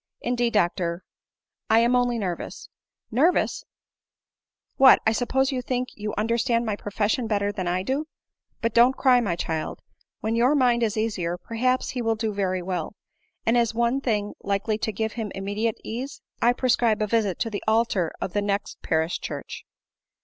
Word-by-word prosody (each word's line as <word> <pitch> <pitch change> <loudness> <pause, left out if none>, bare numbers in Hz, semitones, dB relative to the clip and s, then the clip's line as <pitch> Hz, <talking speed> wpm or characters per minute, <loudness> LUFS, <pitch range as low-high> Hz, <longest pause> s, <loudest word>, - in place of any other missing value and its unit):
" - - -58
Indeed, 240 -1 0
doctor, 175 -3 0 0.7
I 220 - +5
am 240 +2 +3
only 245 -1 +2
nervous." 185 -5 -5 0.2
" - - -54
Nervous! 345 +4 +2 0.6
— - - -58
What, 260 - +9
I 220 - +4
suppose 260 +4 +1
ycu 255 -2 -2
think 250 0 -2
you 210 0 -5
under 230 +3 +1
stand 235 -1 +1
my 215 -2 -1
profession 210 +4 -1
better 205 -2 0
dian 190 -3 -4
I 180 +1 0
do. 275 +8 -2 0.6
But 230 -1 +1
don't 245 +3 +5
cry, 255 -2 +5
iny 190 -8 -1
child; 160 -2 -3 0.4
when 220 +1 -1
your 250 +5 +4
mind 245 -3 +3
is 220 -2 0
easier, 185 -6 -1
perhaps 255 +6 -1
he 250 - -3
will 225 -1 +1
do 220 -1 -2
very 185 -2 -1
well; 180 0 -3 0.5
and, 230 - +3
as 235 -2 +2
one 235 +3 +1
thing 210 -5 -1
likely 200 +2 -1
to 220 - -1
give 220 +2 -2
him 220 -4 -4
immediate 205 +3 -2
ease, 255 +5 -5 0.2
I 240 - +5
prescribe 235 -4 +2
a - - +2
visit 210 -4 0
to 225 - -1
the 205 - -4
altar 220 -6 +2
of 180 - -4
the 205 - +1
next 200 0 -2
parish 160 +1 0
church." - - -7
220 Hz, 185 wpm, -25 LUFS, 200-240 Hz, 0.7 s, What